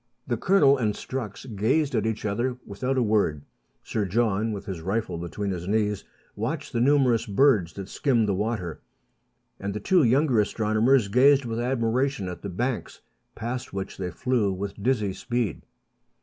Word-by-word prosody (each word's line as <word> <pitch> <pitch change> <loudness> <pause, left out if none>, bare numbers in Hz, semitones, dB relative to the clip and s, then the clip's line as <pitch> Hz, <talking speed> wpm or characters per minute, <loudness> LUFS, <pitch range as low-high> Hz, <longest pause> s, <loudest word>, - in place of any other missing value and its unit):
The 120 - -1
Colonel 140 - +4
and 105 -4 0
Strux 125 -3 -6
gazed 135 +8 +1
at 110 -2 +1
each 110 -1 -3
other 120 +5 -1
without 125 +6 -2
a 125 - +3
word; 100 -10 +1 0.4
Sir 110 - -2
John, 110 +1 +1
with 100 -2 -5
his 95 -4 -5
rifle 95 -1 -2
between 90 +4 -3
his 90 -1 -5
knees, 105 -1 0 0.3
watched 130 +8 -4
the 115 - +1
numerous 130 -4 +3
birds 105 - +3
that 100 -1 -7
skimmed 120 -2 +1
the 100 - +1
water; 100 -4 -3 0.8
and 100 0 -4
the - - -2
two 180 - +3
younger 130 -1 +3
astronomers 110 +3 +2
gazed 135 +5 +5
with 115 -1 -3
admiration 120 -2 0
at 90 -1 -6
the 100 - -5
banks, 120 +6 -3 0.3
past 120 0 -5
which 95 -1 -5
they 90 -2 -2
flew 115 +1 0
with 100 +1 -5
dizzy 105 -4 +1
speed. 120 -1 -2
110 Hz, 165 wpm, -26 LUFS, 100-125 Hz, 0.8 s, gazed